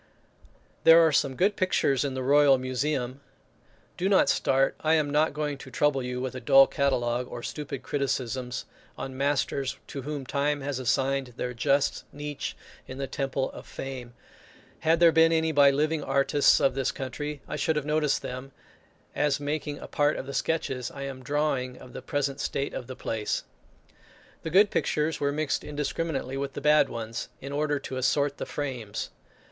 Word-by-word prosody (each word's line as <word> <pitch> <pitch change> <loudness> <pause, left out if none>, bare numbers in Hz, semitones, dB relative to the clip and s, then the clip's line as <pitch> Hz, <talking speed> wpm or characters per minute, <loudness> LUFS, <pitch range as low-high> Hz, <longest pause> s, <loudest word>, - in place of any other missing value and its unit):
There 165 0 +8
are 160 - +3
some 140 -2 +1
good 200 +6 +2
pictures 140 -8 +2
in 135 -2 -2
the 130 - -3
royal 140 0 +5
museum. 130 0 -2 0.8
Do 185 +2 0
not 195 - +4
start, 135 0 +2
I 160 +1 +3
am 150 -2 +1
not 150 +2 +3
going 150 -2 -3
to 135 - -10
trouble 135 +1 +1
you 125 0 -4
with 130 0 -3
a 130 - -5
dull 135 +1 +7
catalogue, 125 -4 0
or 120 - -7
stupid 140 -3 -5
criticisms 130 -3 -2 0.3
on 135 -1 -6
masters 140 -1 0
to 140 - -6
whom 145 0 -5
time 145 +2 0
has 135 -1 -3
assigned 130 0 0
their 125 - -3
just 140 +4 +1
niche 145 0 -5 0.3
in 130 - -8
the 135 - -2
temple 135 0 -2
of - - -11
fame; 125 -3 -7 0.6
had 160 +1 +2
there 170 -1 +7
been 165 0 +5
any 160 0 +2
by 145 -2 +6
living 150 +2 0
artists 140 +1 +3
of 135 - +3
this 135 -1 0
country, 145 +3 -5
I - - -4
should 155 +2 0
have 150 -1 -1
noticed 150 -1 +1
them, 130 +2 -6 0.6
as 145 -1 +1
making 145 0 -3
a - - -9
part 145 +1 +1
of - - -5
the 140 - -7
sketches 135 -7 -1
I 140 - -7
am 135 -1 -6
drawing 135 -2 -1
of 125 - -13
the - - -7
present 140 -1 -2
state 140 0 -2
of 125 - -5
the 130 - -7
place. 110 -4 -2 1.0
The 160 - -4
good 200 +5 +5
pictures 155 +1 0
were 140 0 +1
mixed 150 0 -1
indiscriminately 145 -2 -3
with 140 0 -3
the - - -5
bad 150 0 +4
ones, 115 0 -5
in 140 - -7
order 145 0 0
to 135 -1 -6
assort 140 +2 +1
the - - -4
frames. 125 -8 -4
140 Hz, 180 wpm, -27 LUFS, 130-150 Hz, 1.0 s, There